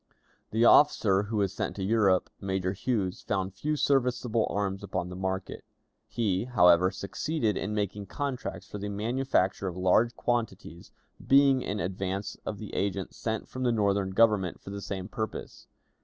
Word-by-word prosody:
The 115 Hz, +2 st, +2 dB
officer 110 Hz, -9 st, +5 dB
who 110 Hz, -, -1 dB
was 100 Hz, -2 st, +1 dB
sent -, -, -3 dB
to 95 Hz, -, -4 dB
Europe, 100 Hz, -3 st, +2 dB
Major 95 Hz, -1 st, -1 dB
Huse, 100 Hz, -3 st, -2 dB
found 95 Hz, -2 st, -2 dB
few 150 Hz, +7 st, -2 dB
serviceable 125 Hz, -5 st, +1 dB
arms 100 Hz, -1 st, -2 dB
upon 90 Hz, -2 st, -3 dB
the 90 Hz, -, -7 dB
market; 95 Hz, 0 st, -4 dB, 0.4 s
he, 105 Hz, -3 st, -1 dB
however, 90 Hz, -7 st, +5 dB
succeeded 110 Hz, +4 st, -2 dB
in 105 Hz, +3 st, -3 dB
making 100 Hz, -1 st, -3 dB
contracts 125 Hz, -9 st, -4 dB
for 105 Hz, -, -7 dB
the 105 Hz, +1 st, -4 dB
manufacture 105 Hz, -2 st, 0 dB
of 90 Hz, -1 st, -5 dB
large 100 Hz, +6 st, +3 dB
quantities, 105 Hz, -8 st, -3 dB, 0.4 s
being 135 Hz, -1 st, +5 dB
in 105 Hz, -1 st, -3 dB
advance 95 Hz, +3 st, -3 dB
of 105 Hz, -, -3 dB
the 105 Hz, -2 st, -8 dB
agents 100 Hz, -1 st, -2 dB
sent 110 Hz, -2 st, -3 dB
from 130 Hz, -, -7 dB
the 125 Hz, -1 st, +2 dB
Northern 100 Hz, -3 st, +1 dB
Government 100 Hz, -3 st, +2 dB
for 100 Hz, -, -10 dB
the 100 Hz, 0 st, -5 dB
same 95 Hz, -2 st, -5 dB
purpose. 110 Hz, 0 st, -6 dB
100 Hz, 160 wpm, -28 LUFS, 95-115 Hz, 0.4 s, officer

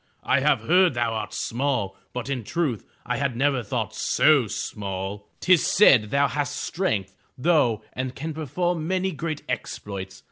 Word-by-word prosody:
I -, -, +3 dB
have -, -, +2 dB
heard 175 Hz, +4 st, +4 dB
thou 120 Hz, -1 st, 0 dB
art 110 Hz, -, -4 dB
small, 120 Hz, -6 st, -1 dB, 0.2 s
but 125 Hz, 0 st, -5 dB
in 135 Hz, -4 st, -2 dB
truth 145 Hz, -4 st, -2 dB, 0.2 s
I 125 Hz, 0 st, -1 dB
had 140 Hz, -3 st, -1 dB
never 135 Hz, 0 st, +2 dB
thought 105 Hz, -, -3 dB
so 145 Hz, -7 st, +3 dB
small! 100 Hz, 0 st, -5 dB
Tis 185 Hz, -3 st, +4 dB
said 125 Hz, -, +5 dB
thou 140 Hz, +3 st, +3 dB
hast 145 Hz, -2 st, -2 dB
strength, 110 Hz, -, -2 dB, 0.2 s
though, 125 Hz, -8 st, +2 dB
and 130 Hz, 0 st, -4 dB
can 160 Hz, +3 st, -4 dB
perform 160 Hz, +2 st, -2 dB
many 190 Hz, +1 st, 0 dB
great 155 Hz, -1 st, -4 dB
exploits! 100 Hz, -5 st, -5 dB
130 Hz, 155 wpm, -25 LUFS, 110-155 Hz, 0.2 s, said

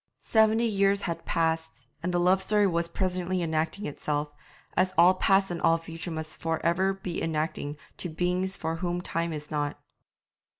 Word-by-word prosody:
Seventy 220 Hz, +1 st, +4 dB
years 200 Hz, -2 st, +2 dB
had 170 Hz, -, -3 dB
passed, 160 Hz, -6 st, -1 dB, 0.2 s
and 180 Hz, -, -1 dB
the 175 Hz, -, +1 dB
love 185 Hz, +2 st, +4 dB
story 210 Hz, +1 st, +3 dB
was 170 Hz, -3 st, +1 dB
presently 185 Hz, 0 st, -1 dB
enacting 160 Hz, +5 st, -1 dB
itself, 150 Hz, 0 st, -2 dB, 0.4 s
as 185 Hz, 0 st, +2 dB
all 175 Hz, +2 st, +7 dB
past 195 Hz, 0 st, +3 dB
and 170 Hz, -, -3 dB
all 165 Hz, -, +4 dB
future 165 Hz, +1 st, -7 dB
must 160 Hz, -1 st, -5 dB
for 165 Hz, -1 st, -1 dB
ever 185 Hz, +3 st, +3 dB
be 190 Hz, -3 st, -5 dB
enacting 155 Hz, -2 st, -2 dB, 0.2 s
to 175 Hz, -, -4 dB
beings 180 Hz, +3 st, -1 dB
for 160 Hz, 0 st, -2 dB
whom 175 Hz, +1 st, -2 dB
time 170 Hz, -1 st, -2 dB
is 150 Hz, -1 st, -7 dB
not. 145 Hz, -1 st, -1 dB
170 Hz, 170 wpm, -28 LUFS, 160-190 Hz, 0.4 s, all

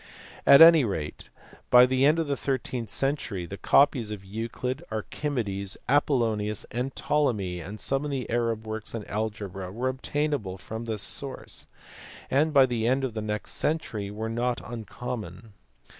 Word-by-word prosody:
Afc 140 Hz, -, +9 dB
any 165 Hz, -2 st, +9 dB
rate 80 Hz, -9 st, -4 dB, 0.4 s
by 125 Hz, 0 st, +8 dB
the 130 Hz, +1 st, +2 dB
end 155 Hz, +2 st, +4 dB
of 165 Hz, -, +1 dB
the 140 Hz, -1 st, -1 dB
thirteenth 130 Hz, -4 st, -3 dB
century 115 Hz, -9 st, -1 dB, 0.2 s
copies 135 Hz, -6 st, +4 dB
of 100 Hz, -2 st, -7 dB
Euclid, 115 Hz, +6 st, -4 dB
Archimedes, 110 Hz, -4 st, -3 dB
Apollonius, 115 Hz, -8 st, +1 dB, 0.3 s
Ptolemy, 105 Hz, -12 st, 0 dB
and 100 Hz, +6 st, -8 dB
some 135 Hz, +1 st, 0 dB
of -, -, -2 dB
the 135 Hz, -3 st, -3 dB
Arab 115 Hz, -2 st, -1 dB
works 110 Hz, +1 st, -5 dB
on 110 Hz, -3 st, -5 dB
algebra 100 Hz, -3 st, -4 dB
were 125 Hz, +6 st, -1 dB
obtainable 130 Hz, -6 st, -2 dB
from 110 Hz, +4 st, -7 dB
this 110 Hz, -3 st, -3 dB
source, -, -, -3 dB, 0.6 s
and 150 Hz, +4 st, +3 dB
by 140 Hz, -3 st, +7 dB
the 120 Hz, -3 st, -1 dB
end 130 Hz, +2 st, +2 dB
of 130 Hz, -4 st, -2 dB
the 110 Hz, -, -3 dB
next 105 Hz, 0 st, -3 dB
century 110 Hz, -10 st, -1 dB
were 110 Hz, +2 st, -4 dB
not 120 Hz, +2 st, -1 dB
uncommon. 115 Hz, -3 st, -7 dB
115 Hz, 150 wpm, -27 LUFS, 105-135 Hz, 0.6 s, Afc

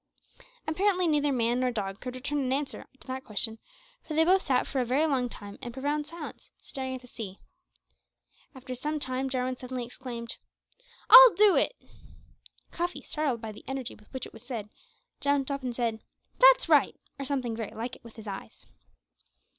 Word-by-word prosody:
Apparently 365 Hz, +3 st, +2 dB
neither 295 Hz, -2 st, +2 dB
man 240 Hz, -1 st, +1 dB
nor 255 Hz, 0 st, +2 dB
dog 200 Hz, -4 st, -3 dB
could 250 Hz, 0 st, -6 dB
return 285 Hz, +3 st, -2 dB
an 260 Hz, -2 st, -1 dB
answer 275 Hz, +1 st, -2 dB
to -, -, -15 dB
that 260 Hz, 0 st, -5 dB
question, 220 Hz, +1 st, +2 dB, 0.4 s
for 310 Hz, -, -6 dB
they 320 Hz, -, +5 dB
both 375 Hz, +2 st, +5 dB
sat 260 Hz, -7 st, +1 dB
for 265 Hz, -, -1 dB
a -, -, 0 dB
very 265 Hz, +6 st, +2 dB
long 260 Hz, -5 st, +1 dB
time 205 Hz, -3 st, -9 dB
in 240 Hz, -, -5 dB
profound 290 Hz, +4 st, -2 dB
silence, 330 Hz, 0 st, -9 dB
staring 260 Hz, -2 st, -5 dB
at 255 Hz, -, -8 dB
the 250 Hz, -, -15 dB
sea. 200 Hz, -5 st, -7 dB, 1.2 s
After 260 Hz, 0 st, -7 dB
some 300 Hz, +5 st, -2 dB
time 260 Hz, -1 st, -2 dB
Jarwin 255 Hz, -1 st, -1 dB
suddenly 250 Hz, -1 st, -5 dB
exclaimed, 235 Hz, -1 st, -7 dB, 0.7 s
"I'll -, -, +12 dB
do 415 Hz, -1 st, +6 dB
it!" -, -, +3 dB, 1.0 s
Cuffy, 350 Hz, +1 st, -3 dB
startled 285 Hz, -7 st, -1 dB
by 220 Hz, -, -5 dB
the 210 Hz, -, -12 dB
energy 265 Hz, -2 st, -4 dB
with 210 Hz, -, -19 dB
which 260 Hz, -2 st, -5 dB
it -, -, -12 dB
was 225 Hz, -, -11 dB
said, 230 Hz, -4 st, -6 dB, 0.5 s
jumped 280 Hz, -1 st, +1 dB
up 275 Hz, 0 st, -2 dB
and 250 Hz, -2 st, -4 dB
said, 230 Hz, -2 st, -1 dB, 0.4 s
"That's -, -, +7 dB
right!" -, -, +4 dB, 0.2 s
or 275 Hz, -, -3 dB
something 260 Hz, -4 st, -2 dB
very 225 Hz, -2 st, -6 dB
like 235 Hz, +3 st, -4 dB
it -, -, -19 dB
with 230 Hz, -1 st, -13 dB
his 220 Hz, -2 st, -11 dB
eyes. 195 Hz, -1 st, -8 dB
260 Hz, 185 wpm, -28 LUFS, 235-290 Hz, 1.2 s, I'll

